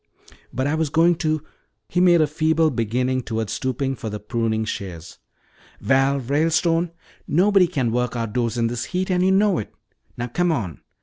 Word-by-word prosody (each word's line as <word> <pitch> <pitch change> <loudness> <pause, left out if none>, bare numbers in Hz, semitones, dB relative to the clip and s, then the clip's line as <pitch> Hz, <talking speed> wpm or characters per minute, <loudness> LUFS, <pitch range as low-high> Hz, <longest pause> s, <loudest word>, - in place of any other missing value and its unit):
"But 130 +2 -2
I 145 - 0
was 160 -1 0
going 165 +3 +4
to 155 -3 -1 0.2
" - - -52
He 180 - 0
made 175 -2 +5
a - - +5
feeble 160 +1 +1
beginning 125 +2 0
toward 110 -3 -3
stooping 135 +1 -2
for 110 - -6
the 105 0 -5
pruning 110 0 -1
shears. 85 -6 -7 0.6
"Val 135 +1 +2
Ralestone, 165 +5 +1 0.4
nobody 190 +2 +4
can 135 -9 -1
work 125 +1 -1
outdoors 115 0 -2
in 115 - +1
this 120 +1 -2
heat, 185 +5 -2
and 180 0 +2
you 190 - +3
know 195 -1 +3
it. 105 - -6 0.5
Now 120 - -2
come 175 +8 0
on. 100 - -3
135 Hz, 180 wpm, -22 LUFS, 115-165 Hz, 0.6 s, made